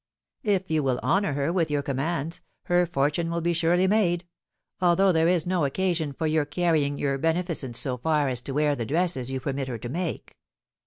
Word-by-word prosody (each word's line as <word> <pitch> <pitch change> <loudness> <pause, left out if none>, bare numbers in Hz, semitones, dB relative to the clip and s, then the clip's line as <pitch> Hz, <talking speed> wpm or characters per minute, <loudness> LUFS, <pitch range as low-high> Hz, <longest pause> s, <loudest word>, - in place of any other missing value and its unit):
If 195 -5 0
you 155 -1 +2
will 130 -3 0
honour 195 -4 +1
her 140 +4 -1
with 170 -4 +1
your 145 -1 0
commands, 150 +4 -2 0.2
her 175 0 +2
fortune 160 +1 0
will 170 0 -1
be 170 +1 +1
surely 170 +2 +2
made; 185 -4 +2 0.6
although 185 +2 +4
there 165 -1 +3
is 175 -2 +2
no 180 -2 0
occasion 165 +1 0
for 160 +4 -4
your 155 -1 +2
carrying 150 -2 0
your 140 -1 -1
beneficence 165 -6 -1
so 130 -3 +1
far 150 +2 +1
as 125 -2 -2
to 130 - -6
wear 150 +1 +1
the 120 - -3
dresses 150 -2 0
you 135 0 -2
permit 135 0 -3
her 125 -3 -4
to 120 +2 -7
make." 170 +3 -4
160 Hz, 200 wpm, -26 LUFS, 140-175 Hz, 0.6 s, although